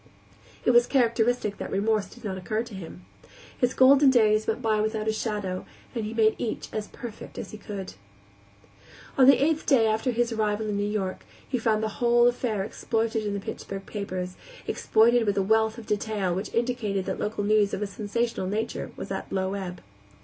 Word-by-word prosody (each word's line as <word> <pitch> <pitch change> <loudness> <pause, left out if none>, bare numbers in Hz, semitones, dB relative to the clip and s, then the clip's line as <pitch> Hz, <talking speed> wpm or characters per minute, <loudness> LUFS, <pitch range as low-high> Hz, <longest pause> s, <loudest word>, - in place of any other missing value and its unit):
It - - +5
was 240 0 +5
characteristic 235 -4 +1
that - - -4
remorse 210 0 +1
did 240 - -15
not 195 -3 -3
occur 215 +4 -2
to 235 - -12
him. 180 -1 -9 0.5
His 245 0 0
golden 270 +2 +7
days 215 -4 +4
went 220 - 0
by 215 -1 +1
without 215 0 -1
a 220 - +2
shadow, 205 -4 -3 0.3
and 230 -3 -2
he 215 - -4
made 220 -1 +4
each 230 - -3
as 215 -1 -3
perfect 230 -3 -9
as - - -6
he 215 - -9
could. 200 - -6 1.2
On 260 -1 +6
the 275 - +8
eighth 310 +3 +1
day 265 -6 +5
after 220 +3 +1
his 240 0 +1
arrival 215 -1 0
in 205 - -1
New 205 0 0
York 195 -3 -3 0.2
he 255 - -1
found 220 -1 +1
the 220 - 0
whole 240 0 +5
affair 240 -4 0
exploited 225 +1 -1
in 200 - -2
the - - -2
Pittsburgh 195 0 -6
papers, 185 -3 -4 0.3
exploited 230 +1 +3
with 205 - +1
a 195 - +3
wealth 220 +2 +2
of 230 - -9
detail 210 -3 -1
which 190 +4 -4
indicated 230 -5 -1
that - - -3
local 210 -1 -2
news 210 -1 +3
of 205 - -2
a - - 0
sensational 215 0 -2
nature 215 +4 -3
was - - -6
at - - -4
a - - -2
low 190 0 0
ebb. 185 -3 -5
215 Hz, 200 wpm, -26 LUFS, 200-235 Hz, 1.2 s, the